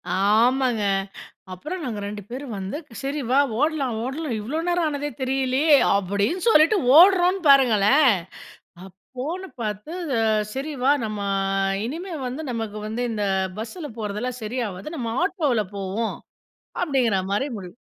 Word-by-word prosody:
ஆமாங்க. 230 +4 +2 0.7
அப்புறம் 325 - -6
நாங்க 220 -4 -4
2 205 0 -6
பேரும் 255 -3 -6
வந்து 195 +9 -4 0.3
சரி 285 +2 -2
வா! 270 - +4 0.2
ஓட்லாம், 290 -6 0
ஓட்லாம் 275 -2 -3
இவ்ளோ 285 +9 -3
நேரம் 350 -1 +1
ஆனதே 290 0 -3
தெரியலயே! 265 +3 +2 0.2
அப்புடின்னு 200 - -1
சொல்லிட்டு 335 +3 +5 0.2
ஓடுறோன்னு 365 +1 +6
பாருங்களேன்! 260 +1 +5 0.8
அப்போன்னு 265 - -7
பார்த்து 210 - -4 0.3
அ - - +2 0.3
"சரி 280 +4 -4
வா! 270 - +4
நம்மா 210 -2 -3 0.6
இனிமே 335 +8 -5
வந்து 260 +6 -4
நமக்கு 225 -3 -4
வந்து 225 +3 -3
இந்த 210 - -2 0.4
பஸ்ல 295 +7 -6
போறதெல்லாம் 220 +4 -4
சரியாவாது. 215 -1 -4
நம்ம 230 -4 -3
ஆட்டோல 300 - +1
போவோம்." 200 +4 -3 0.7
அப்பிடிங்கிற 260 - +1
மாதிரி 210 +8 0
முடிவ் 180 -1 -10
255 Hz, 125 wpm, -23 LUFS, 215-305 Hz, 0.8 s, ஓடுறோன்னு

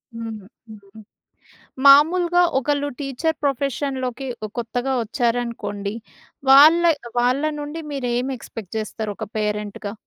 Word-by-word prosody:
హ్మ్. 225 -2 -6 0.3
హ్మ్. 210 0 -14 0.9
మామూలుగా 345 +5 +6 0.2
ఒకళ్ళు 285 +1 -1
టీచర్ 285 +3 -2
ప్రొఫెషన్‌లోకి 270 -1 -2 0.2
ఒ - - -10
కొత్తగా 245 +3 -2
వచ్చారనుకోండి 230 -4 -2 0.6
వాళ్ళ, 305 +5 +8 0.4
వాళ్ళానుండి 295 +5 -1
మీరేమి 250 0 -2
ఎక్‌స్పెక్ట్ 220 -4 -10
చేస్తారు 215 0 -4
ఒక 220 - -5
పేరెంట్‌గా? 210 -1 -3
250 Hz, 95 wpm, -22 LUFS, 220-285 Hz, 0.9 s, వాళ్ళ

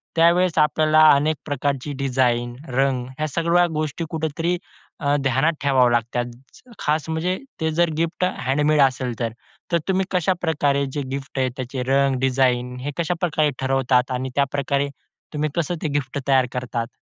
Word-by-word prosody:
त्यावेळेस 170 +1 +3
आपल्याला 155 0 +3 0.2
अनेक 150 +2 +1
प्रकारची 145 -1 -2
डिझाइन, 120 -2 +1 0.2
रंग 130 -1 +1
ह्या 155 0 -1
सगळ्या 170 +3 +2
गोष्टी 155 +2 -2
कुठेतरी 165 +2 -1 0.4
अ, 145 0 +1
ध्यानात 135 +5 +2
ठेवावे 130 -3 +4
लागतात. 120 +1 0 0.5
खास 155 +1 -1
म्हणजे 175 +4 -1 0.2
ते 160 0 +1
जर 175 - +4
गिफ्ट 165 +2 -1 0.2
हँडमेड 150 +2 +3
असेल 130 -3 +1
तर. 115 -2 -1 0.4
तर 170 - +4
तुम्ही 190 0 +1
कशाप्रकारे 160 -6 +1
जे 145 - -2
गिफ्ट 135 0 -5
आहे, 130 -1 +2
त्याचे 130 0 -4
रंग, 135 0 +2
डिझाइन 125 -1 +1
हे 145 +2 -3
कशाप्रकारे 165 -2 0
ठरवतात? 130 -1 +1
आणि 130 +1 -2
त्याप्रकारे 140 0 0 0.4
तुम्ही 150 0 -1
कसं 170 +1 -1
ते 155 - +1
गिफ्ट 135 +1 -6
तयार 130 -2 +4
करतात? 120 -1 -4
140 Hz, 150 wpm, -22 LUFS, 130-160 Hz, 0.5 s, ठेवावे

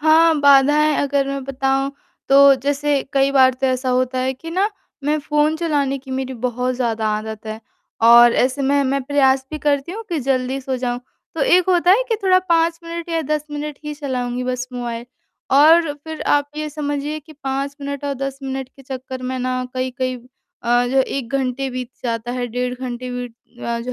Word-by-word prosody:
हाँ, 320 +2 +5
बाधाएँ 290 +2 +5
अगर 280 -1 +1
मैं 275 0 -3
बताऊँ 270 +1 0 0.4
तो 275 0 +7
जैसे 285 +1 0
कई 275 0 +3
बार 260 -2 +5
तो 270 - +2
ऐसा 255 0 -1
होता 255 +1 0
है 260 +1 0
कि 330 +6 -9
ना 385 +5 +1 0.3
मैं 300 +1 +1
फ़ोन 300 +1 +1
चलाने 290 -5 0
की 265 0 -13
मेरी 260 0 -3
बहुत 250 +1 -2
ज़्यादा 230 -3 -1
आदत 220 0 -7
है 220 +1 -5 0.5
और 240 0 +8
ऐसे 260 +2 +1
में 280 +1 +2
मैं 275 +1 0
प्रयास 265 -1 +2
भी 310 - -4
करती 290 +2 0
हूँ 450 +3 -6
कि 340 -3 -1
जल्दी 260 0 -1
सो 260 0 -3
जाऊँ। 245 -1 -2 0.3
तो 325 - -4
एक 360 +5 +4
होता 355 -1 +4
है 425 +7 +5
कि 455 - +1
थोड़ा 370 -1 +5
5 330 0 +2
मिनट 335 0 -6
या 330 -1 0
10 300 0 -1
मिनट 295 -1 -5
ही 300 0 -4
चलाऊँगी 250 -4 -3
बस 255 0 -2
मोबाइल 240 -1 -5 0.5
और 320 +2 +6
फ़िर 310 +2 -9
आप 290 0 +1
ये 305 0 -3
समझिए 290 0 -3
कि 310 +2 -15
पाँच 275 -1 -4
मिनट 280 0 -5
और 285 -1 -1
10 275 0 -4
मिनट 265 -1 -4
के 270 - -18
चक्कर 260 -1 -7
में 255 0 -3
ना 255 0 -1
कई-कई 255 0 -2 0.5
अ, 240 +1 +2
जो 255 +2 -1
है 265 - +6
1 265 -2 -4
घंटे 270 0 -1
बीत 250 -1 -5
जाता 230 0 -2
है, 250 -1 -2
डेढ़ 250 +1 -2
घंटे 250 0 -6
बीत 245 -1 -5 0.3
अ, 235 0 -2
जो 250 +2 -5
270 Hz, 200 wpm, -20 LUFS, 255-295 Hz, 0.5 s, और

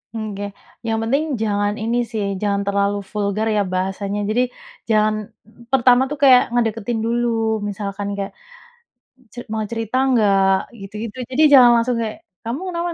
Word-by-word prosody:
Nggeh, 205 -2 -4 0.4
yang 225 0 0
penting 275 +7 +1 0.2
jangan 205 -1 0
ini, 235 +2 0
sih, 215 -2 -2 0.2
jangan 200 -1 0
terlalu 200 0 +1
vulgar, 210 +1 -1
ya, 210 - +3
bahasanya, 195 +2 -2
jadi 230 +3 +2 0.5
jangan 215 -1 +3 0.6
pertama, 250 -1 +5
tuh, 295 - -4
kayak 255 -2 +8
ngedeketin 230 -1 -1
dulu, 240 +1 0 0.4
misalkan 200 0 -5
kayak, 195 -1 -4 1.0
"Ce - - -19
mau 220 -1 -1
cerita 225 +1 -3
nggak?" 200 -5 +3 0.3
Gitu-gitu, 210 +4 -7
jadi 285 +5 +3
jangan 250 -3 +9
langsung 235 +1 +1
kayak, 220 -1 -4 0.3
"Kamu 235 +6 -3
kenapa?" 340 0 -2
220 Hz, 145 wpm, -20 LUFS, 205-240 Hz, 1.0 s, jangan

